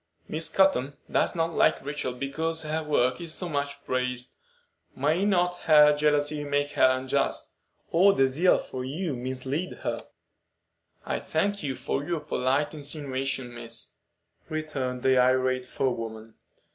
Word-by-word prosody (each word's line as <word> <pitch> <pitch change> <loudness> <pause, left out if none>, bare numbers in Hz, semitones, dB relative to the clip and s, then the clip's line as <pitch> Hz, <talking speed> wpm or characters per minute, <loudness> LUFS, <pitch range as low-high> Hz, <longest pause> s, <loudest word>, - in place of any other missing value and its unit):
"Miss 160 +1 -1
Cotton 145 -8 +2
does - - +2
not 165 0 0
like - - +2
Rachel 145 -3 -2
because 160 +5 -2
her 155 +1 -1
work 130 -3 +1
is 165 -2 -1
so 180 - -3
much 140 -2 -3
praised. 125 -1 -2 0.6
May 155 +8 +1
not 180 -3 +2
her 150 -2 +7
jealousy 150 0 +1
make 145 0 0
her 130 0 +4
unjust, 130 +1 -1 0.3
or 195 +4 +5
her 135 - +5
zeal 160 +8 +3
for 130 -1 -6
you 150 +3 -3
mislead 130 +7 -3
her?" - - -3 1.0
"I - - -1
thank 205 0 -1
you 135 -3 -2
for 135 - -2
your 165 0 -2
polite 145 0 0
insinuations, 140 -4 -3
miss," 115 -1 -4 0.6
returned 140 -5 -3
the 130 -1 +4
irate 130 0 +2
forewoman. 115 -4 -3
145 Hz, 140 wpm, -27 LUFS, 130-155 Hz, 1.0 s, her